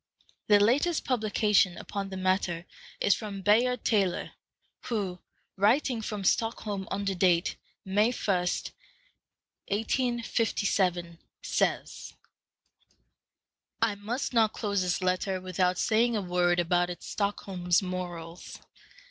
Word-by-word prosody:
The 205 -1 +6
latest 285 +11 +2
publication 210 -6 +2
upon 195 -1 -5
the 190 - -6
matter 185 -2 0 0.3
is 200 - +4
from 200 -3 -6
Bayard 235 +4 +3
Taylor, 195 -5 +1 0.5
who, 195 -6 -2 0.4
writing 230 +4 +2
from 210 -2 -4
Stockholm 205 -1 0
under 200 -1 -1
date 175 -1 +2 0.3
May 205 +5 +2
1, 205 -5 0 1.3
1857, 205 -6 0 0.2
says, - - -1 1.6
"I 225 -2 +2
must 225 +7 -4
not 225 -2 +3
close 200 -3 -1
this 180 +1 -1
letter 185 +1 0
without 185 0 0
saying 235 +1 +2
a - - -1
word 175 -1 +2
about 175 +1 +2
its 175 - -7
(Stockholm's) 195 -3 0
morals. 175 -2 -6
200 Hz, 105 wpm, -28 LUFS, 180-220 Hz, 1.6 s, The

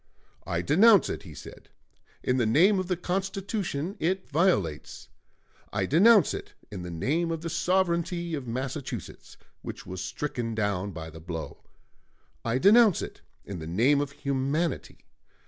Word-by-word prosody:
"I 85 0 -1
denounce 200 - +5
it," - - -4
he - - -12
said, - - -12 0.5
"in 125 - +1
the 120 - +2
name 185 - +4
of 185 - -3
the 180 -2 -1
Constitution 190 -2 -3
it 185 +3 -1
violates. 140 - 0 0.6
I - - 0
denounce 200 +4 +5
it - - -7 0.2
in 95 -4 -6
the 90 - -6
name 150 - -1
of 165 -1 -3
the 170 -1 -4
sovereignty 170 0 0
of 140 -5 -4
Massachusetts, 130 +4 -5 0.2
which - - -8
was 95 0 -6
stricken 120 -6 -3
down 100 -3 -1
by 80 -2 -8
the 80 - -11
blow. 80 -1 -6 0.8
I 115 +1 0
denounce 210 - +5
it - - -8 0.2
in 100 -3 -6
the 80 - -7
name 125 - +3
of 145 -1 -3
humanity. 140 +5 -2
150 Hz, 150 wpm, -27 LUFS, 110-180 Hz, 0.8 s, denounce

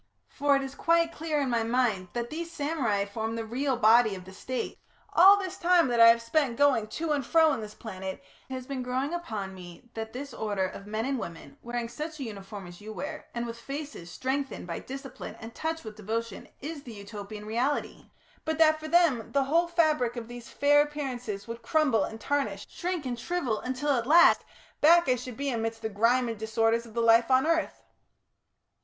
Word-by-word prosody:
For 285 0 +2
it 275 - +1
is 270 0 -6
quite 335 +2 +2
clear, 315 -2 -2
in 265 -3 -1
my 235 -1 +2
mind, 225 -5 +1
that 240 0 -3
these 335 +2 -5
samurai 285 -11 0
form 220 +2 -4
the 225 -1 -3
real 260 +3 -1
body 220 -2 +5
of 185 -1 -10
the 190 - -11
State. 255 +6 -4 0.3
All 390 +4 +8
this 380 -3 -4
time 345 -4 +4
that 240 -1 +1
I 230 - +10
have 230 0 +5
spent 250 -1 +1
going 275 -7 +3
to 310 +8 -3
and 290 -2 +1
fro 320 +3 +4
in 230 - -3
this 210 0 -8
planet, 190 -3 -6 0.3
it - - -5
has 255 -1 -6
been 270 -1 -4
growing 260 +5 -2
upon 215 - -4
me 180 +6 -12
that 220 0 -5
this 270 +2 -7
order 205 -4 -1
of 200 +2 -7
men 215 +2 -2
and 270 -1 -1
women, 165 -7 -8
wearing 240 0 -3
such 305 +6 -6
a - - -3
uniform 200 -3 -8
as 175 +2 -12
you 215 +1 -8
wear, 300 +7 -6
and 235 0 -2
with 230 0 -7
faces 280 - -7
strengthened 265 +8 -3
by 170 -1 -4
discipline 270 -1 -8
and 225 0 -9
touched 320 +4 -3
with 215 -1 -8
devotion, 220 0 -4
is 300 +1 -5
the 240 -4 -10
Utopian 205 0 -8
reality; 240 +7 -2 0.3
but 315 0 -2
that 310 -1 +5
for 310 - -6
them, 310 -8 +3
the 280 -1 +3
whole 330 +6 +2
fabric 310 -8 +2
of 235 -2 -6
these 240 -1 -9
fair 290 +1 +4
appearances 250 -9 -4
would 230 0 -6
crumble 265 -4 +2
and 220 - -8
tarnish, 285 +4 -1
shrink 355 -4 -3
and 245 -2 -3
shrivel, 260 -6 -1
until 260 +3 -1
at 240 -3 0
last, 340 +4 +6 0.4
back 340 +3 +6
I 255 - +5
should 250 -1 -7
be 280 0 -1
amidst 225 -1 -3
the 220 - -1
grime 235 +4 +2
and 225 -2 -4
disorders 225 +1 +1
of 220 - -15
the 235 - +1
life 230 +1 +5
of 260 +1 +4
earth. 330 0 0
245 Hz, 210 wpm, -28 LUFS, 220-290 Hz, 0.4 s, I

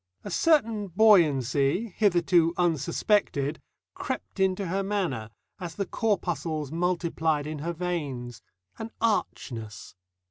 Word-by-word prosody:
A 205 - -6
certain 225 - +2
buoyancy, 170 - +3
hitherto 175 -4 +3
unsuspected, 165 -2 +1 0.3
crept - - -5
into 190 +1 +1
her 190 +3 -1
manner, 185 - -2 0.3
as 175 -3 -6
the 200 - -2
corpuscles 165 - -2
multiplied 165 -3 0
in 155 0 -5
her 170 +4 -3
veins 145 -9 -4 0.4
an 225 - -5
archness. 115 - -2
170 Hz, 105 wpm, -27 LUFS, 150-200 Hz, 0.4 s, buoyancy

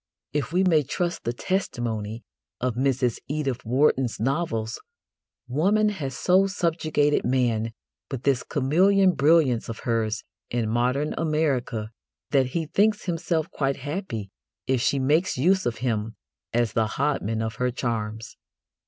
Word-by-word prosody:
If 145 -3 -1
we 180 +2 +3
may 165 -5 +4
trust 170 +5 -3
the 120 - +1
testimony 120 - -2 0.4
of 125 -1 0
Mrs 125 -1 +1
Edith 140 -4 -2
Wharton's 130 0 +2
novels, 115 -3 -1 0.7
woman 195 +11 +2
has 140 -11 -4
so 190 +2 +4
subjugated 155 -5 +1
man 120 -3 +1 0.4
with 135 -3 -5
this 135 -3 +2
chameleon 185 +8 +3
brilliance 145 -6 +3
of 115 - -6
hers 110 -2 -1 0.3
in 120 -2 -1
modern 125 +6 +1
America 140 -9 0 0.4
that 135 -3 +3
he 160 +5 -2
thinks 205 +7 +2
himself 165 -2 -1
quite 135 -1 -1
happy 140 - -5 0.3
if 130 -2 +1
she 140 - +2
makes 150 +7 +2
use 185 +6 +3
of 115 -2 -2
him 110 -2 -1 0.4
as 120 -2 +1
the 110 -1 +2
hodman 120 -6 0
of 110 0 -4
her 125 0 +1
charms. 110 -3 -4
135 Hz, 135 wpm, -25 LUFS, 115-160 Hz, 0.7 s, may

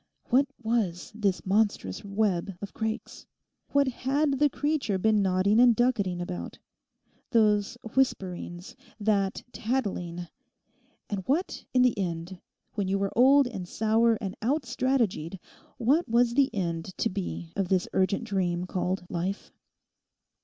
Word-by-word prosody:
What 270 +3 +4 0.2
was 220 -6 -1
this 205 -4 -1
monstrous 195 - 0
web 195 -3 -1
of 200 - -7
Craik's? 220 0 -4 0.4
What 280 -1 +3
had 275 +2 0
the 295 0 +5
creature 290 -8 0
been 215 +2 +3
nodding 195 +3 +3
and 240 -2 +6
ducketing 205 -7 +1
about?—those 205 - -2 0.2
whisperings, 180 -8 -1 0.2
that 200 -2 0
tattling? 190 -9 -2 0.8
And 205 -3 -3
what 320 +8 -1
in 250 -1 +4
the 250 -2 +3
end, 175 0 -4 0.3
when 200 -3 -1
you 195 +1 +1
were 195 0 -2
old 270 +3 +6
and 195 -8 -5
sour 225 +3 +2
and 195 -4 -4
out 275 +7 +1
strategied, 240 - 0 0.4
what 275 +8 +2
was 235 +1 +3
the 275 +1 +4
end 170 -2 -3
to 230 - +1
be 180 -3 -5
of 195 -2 0
this 185 -1 +1
urgent 190 +3 +1
dream 180 -5 -1
called 185 0 -2
Life? 180 +4 -3
205 Hz, 130 wpm, -28 LUFS, 185-245 Hz, 0.8 s, and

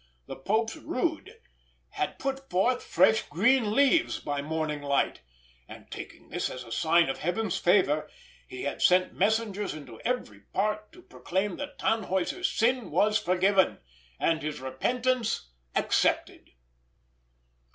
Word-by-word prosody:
The - - -7
Pope's 220 +10 0
rood 340 - -3 0.5
had - - -3
put 270 0 -4
forth 240 +7 +2
fresh 220 - +4
green 215 - +3
leaves 280 +5 +3
by 145 -1 -3
morning 155 0 -2
light; 140 - 0 0.5
and - - -13
taking - - -9
this - - -2
as 125 - -7
a 115 - -13
sign 170 +6 +3
of 135 - -3
Heaven's 190 +3 -1
favour, 175 -5 +3 0.4
he 130 - -7
had 140 - -3
sent 185 0 +4
messengers 210 -2 0
into 130 -7 -11
every 250 +1 -2
part 210 +2 -2
to 360 - -15
proclaim 200 - -3
that 285 0 -7
Tannhäuser's 220 - 0
sin 245 - +1
was 215 +1 +3
forgiven, 190 0 +2 0.4
and 165 -1 +1
his 150 0 -4
repentance 225 - -1 0.3
accepted. - - +1
200 Hz, 130 wpm, -28 LUFS, 160-245 Hz, 0.5 s, fresh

